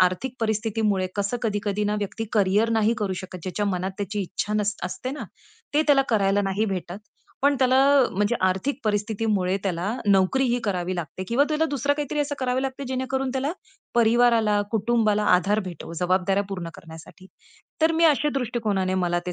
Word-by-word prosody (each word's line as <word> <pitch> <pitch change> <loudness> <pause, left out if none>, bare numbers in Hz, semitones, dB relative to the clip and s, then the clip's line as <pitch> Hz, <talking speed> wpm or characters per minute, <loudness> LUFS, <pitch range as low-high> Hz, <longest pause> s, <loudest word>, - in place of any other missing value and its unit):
आर्थिक 185 +8 +1
परिस्थितीमुळे 215 -3 0
कसं 205 +4 -1
कधी-कधी 205 -2 -1
ना 210 0 0
व्यक्ती 205 +2 -4
करिअर 205 +1 +3
नाही 225 0 +2
करू 200 -3 -1
शकत. 185 -1 -8
ज्याच्या 195 +3 -2
मनात 190 -1 -1
त्याची 205 +1 -3
इच्छा 205 +3 -4
नस 210 -1 0
असते 220 +7 -4
ना 275 -3 -5 0.5
ते 300 - +4
त्याला 280 -2 +5
करायला 200 -3 +2
नाही 195 +2 0
भेटत. 185 -2 -4 0.4
पण 285 +1 +4
त्याला 260 0 +3 0.4
म्हणजे 205 +4 +1
आर्थिक 190 +11 -1
परिस्थितीमुळे 205 -2 0
त्याला 180 -3 -2 0.2
नोकरीही 235 +6 +3
करावी 185 -3 -1
लागते. 175 +1 -5
किंवा 255 +5 +3
तुला 305 +1 +2
दुसरं 285 -1 0
काहीतरी 295 0 -3
असं 285 0 -1
करावं 255 0 0
लागते 270 +1 -4
जेणेकरून 260 +1 -2
त्याला, 270 +4 -1 0.4
परिवाराला, 230 -2 +4
कुटुंबाला 215 -1 +1
आधार 205 +4 +1
भेटेल 175 -2 -8
जबाबदाऱ्या 185 +2 +2
पूर्ण 180 -4 -5
करण्यासाठी. 165 +3 -13 0.5
तर 320 +1 +4
मी 330 +1 +2
अशा 300 -1 +4
दृष्टिकोनाने 215 -7 -1
मला 175 0 +1
ते 180 - -2
210 Hz, 165 wpm, -24 LUFS, 190-250 Hz, 0.5 s, त्याला